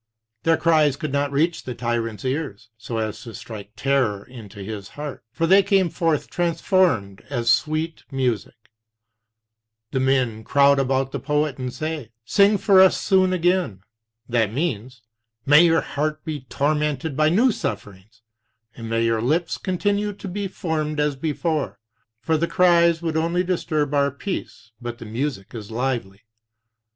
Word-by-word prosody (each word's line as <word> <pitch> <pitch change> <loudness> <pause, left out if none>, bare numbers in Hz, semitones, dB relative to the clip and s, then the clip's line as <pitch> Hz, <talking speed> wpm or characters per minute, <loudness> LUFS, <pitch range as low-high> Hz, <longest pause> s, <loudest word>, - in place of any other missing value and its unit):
Their 165 -1 +3
cries 155 -4 +3
could 155 -1 -4
not 140 0 0
reach 160 +4 +1
the 125 - -6
tyrant's 115 -3 -3
ears 130 -6 -3
so 115 +1 -6
as 110 -1 -3
to 115 - -9
strike 105 -2 -9
terror 115 -4 0
into 105 -5 -10
his 100 -1 -6
heart, 145 -6 -6
for 165 - -1
they 190 +4 +6
came 195 -3 +2
forth 165 -4 0
transformed 170 - +1
as 120 -4 +1
sweet 155 +4 0
music. 125 -6 -1 1.4
And 130 - +1
men 125 -5 +1
crowd 140 +3 +4
about 135 0 0
the - - -3
poet 150 -2 -1
and 125 -1 -3
say: 155 -4 -4 0.2
Sing 200 - +4
for 195 -2 +5
us 190 - +5
soon 190 -1 +3
again. 175 - +1 0.5
That 115 -4 +1
means: 125 -4 -3 0.4
May 150 +4 +7
your 165 -2 +4
heart 155 +1 -3
be 155 -2 -3
tormented 150 0 0
by 155 +1 +3
new 230 +10 +4
sufferings, 105 - -6 0.5
and 115 -1 -7
may 115 0 +1
your 115 -1 +1
lips 160 +7 0
continue 205 +2 -1
to 200 - -9
be 200 +2 -3
formed 155 -4 -3
as 150 -1 +1
before; 155 +1 -2 0.4
for 160 +4 +1
the 170 +2 0
cries 170 -2 +4
would 160 -1 -1
only 170 +3 +1
disturb 155 -5 -1
our 140 -1 +3
peace, 140 - -6
but 120 -1 -5
the 115 - -10
music 115 -2 -4
is 110 -4 -7
lively. 115 -5 -3
145 Hz, 155 wpm, -23 LUFS, 115-165 Hz, 1.4 s, May